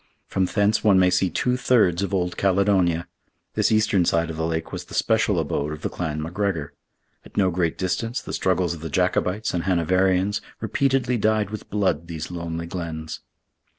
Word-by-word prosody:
From 95 - 0
thence 105 +3 +1
one 105 -3 +5
may 90 -1 +4
see 90 +1 +2
two 125 +6 0
thirds 110 -9 +3
of 100 - -2
old 90 -2 0
Caledonia. 95 -3 +2 0.5
This - - +2
eastern 110 -4 +3
side 85 -1 +1
of 80 - -7
the 80 0 -1
lake 80 0 -3
was - - -5
the - - -9
special - - +2
abode 75 +1 -1
of 75 - -9
the - - -1
clan 75 -3 -3
McGregor. 85 -3 -2 0.5
At - - -16
no 95 -2 +3
great 85 -2 0
distance, 95 +6 -1
the - - -8
struggles 90 -2 +1
of 80 - -9
the 80 - -5
Jacobites 90 +5 0
and 85 -1 -2
Hanoverians 95 +3 +2 0.2
repeatedly 125 +1 +1
dyed 105 -1 +1
with 110 - -7
blood 95 -6 0
these 80 0 -6
lonely 85 -1 -4
glens. 80 -2 -5
90 Hz, 185 wpm, -24 LUFS, 85-100 Hz, 0.5 s, one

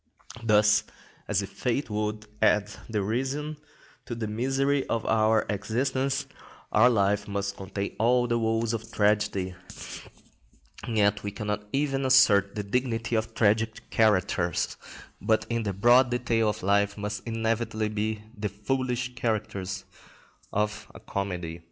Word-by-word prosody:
Thus, 105 -1 +4 0.4
as - - +1
if - - -8
fate 125 0 -2
would 105 0 -2 0.2
add 105 0 +3 0.2
derision 130 +8 -2 0.5
to 120 - -4
the 115 -1 -3
misery 135 +5 +1
of 115 -1 -1
our 110 0 +3
existence, 125 +7 -1 0.5
our 115 +4 +6
life 100 -2 +2
must 100 -1 -2
contain 100 +1 -5
all 120 +2 +4
the 120 -1 +1
woes 115 0 0
of 115 -1 -5
tragedy, 105 -3 +1 1.3
and 115 -2 -3
yet 100 -1 +3
we 105 - -3
cannot 105 0 -4
even 135 -1 0
assert 115 -7 +5
the 105 - -2
dignity 115 +2 -1
of 110 0 -2
tragic 110 +1 +1
characters, 95 -5 +2 0.5
but 110 0 +2
in 115 0 +1
the 105 -3 -1
broad 120 +6 +5
detail 120 -3 +1
of 105 - -4
life 100 +1 +2
must 105 0 -4
inevitably 115 -1 -1
be 105 0 -2
the 105 0 -3
foolish 125 +4 -2
characters 105 -5 -3 0.7
of 105 0 -1
a - - -9
comedy. 90 -4 -4
110 Hz, 135 wpm, -27 LUFS, 105-120 Hz, 1.3 s, our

